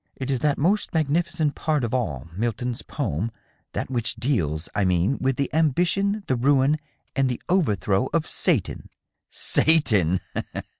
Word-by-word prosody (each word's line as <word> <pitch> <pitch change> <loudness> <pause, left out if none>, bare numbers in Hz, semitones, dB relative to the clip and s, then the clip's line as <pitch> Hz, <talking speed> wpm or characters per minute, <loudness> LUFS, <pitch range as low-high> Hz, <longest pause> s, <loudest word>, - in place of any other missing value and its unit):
" - - -46
It 135 0 -3
is 130 - 0
that 145 0 +1
most 185 +5 +1
magnificent 160 0 +1
part 155 -4 0
of 115 - -2
all 80 - -2
Milton's 120 +3 -2
poem 85 +11 -2 0.2
— - - -43
that - - -3
which 120 -3 -1
deals, 90 - -1
I 100 - +1
mean, 90 +7 +1
with 135 0 +1
the 140 +2 -2
ambition, 180 +7 +1
the 130 - +1
ruin 140 +4 +3 0.4
and 135 -2 +2
the 125 - -3
overthrow 105 - +1
of 165 -2 +1
Satan." - - 0 0.3
" - - -60 0.2
Satan 105 - +4
130 Hz, 160 wpm, -24 LUFS, 110-155 Hz, 0.4 s, Satan